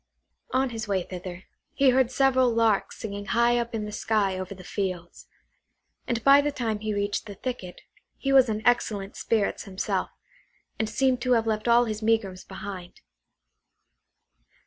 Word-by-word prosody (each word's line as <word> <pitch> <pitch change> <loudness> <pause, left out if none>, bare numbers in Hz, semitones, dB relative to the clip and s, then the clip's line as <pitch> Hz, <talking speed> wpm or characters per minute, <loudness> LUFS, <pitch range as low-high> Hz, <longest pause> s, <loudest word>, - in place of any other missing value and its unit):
On 260 0 +1
his 225 -1 -5
way 195 -3 0
thither, 180 0 -8 0.3
he 275 -2 +5
heard 255 -1 +3
several 260 -1 +3
larks 225 -3 +1
singing 205 -1 -6
high 235 +3 +3
up 235 -1 -3
in 215 -1 -2
the 210 - -6
sky 205 -3 0
over 185 +1 -6
the 185 - -12
fields; 180 -2 -5 0.8
and 235 -2 -1
by 280 +1 +7
the 295 +1 -1
time 230 -6 -2
he 215 0 -3
reached 205 +1 -2
the 205 - -8
thicket 215 -8 -6 0.4
he 275 0 -1
was 260 -3 +6
in 215 0 -3
excellent 210 -4 +1
spirits 220 -3 -1
himself, 190 -1 -2 0.7
and 220 -1 0
seemed 255 +2 +1
to 255 -1 +2
have 230 -2 +2
left 215 0 -1
all 240 +1 +5
his 215 -1 -4
megrims 215 -4 0
behind. 190 -2 -8
220 Hz, 165 wpm, -26 LUFS, 200-245 Hz, 0.8 s, by